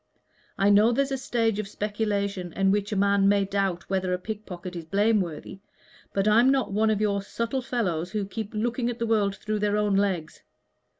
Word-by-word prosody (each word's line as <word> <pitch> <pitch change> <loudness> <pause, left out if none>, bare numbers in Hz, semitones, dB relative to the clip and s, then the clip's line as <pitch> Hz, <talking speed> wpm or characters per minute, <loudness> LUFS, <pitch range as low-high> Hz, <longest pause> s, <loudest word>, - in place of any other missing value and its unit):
I 200 +1 +4
know 210 +3 +5
there's 275 +3 0
a - - +1
stage 225 -4 0
of 215 - -3
speculation 200 -3 -2
in 195 0 +2
which 205 +1 0
a - - -1
man 200 0 +3
may 200 -1 +3
doubt 195 -3 -2
whether 190 -1 -1
a - - +1
pickpocket 185 -3 -7
is 170 - -5
blameworthy 195 -2 0 0.5
but 195 +1 0
I'm 230 +5 +5
not 270 -5 +1
one 220 +2 +2
of 215 -1 +1
your 200 -2 +1
subtle 230 +6 -3
fellows 190 -10 -2
who 205 +1 -2
keep 215 +1 -6
looking 240 +2 -1
at 240 - -4
the 230 - -1
world 210 -3 +1
through 215 +1 -3
their 205 0 +1
own 210 -1 +1
legs. 190 -6 -1
205 Hz, 195 wpm, -26 LUFS, 195-220 Hz, 0.5 s, know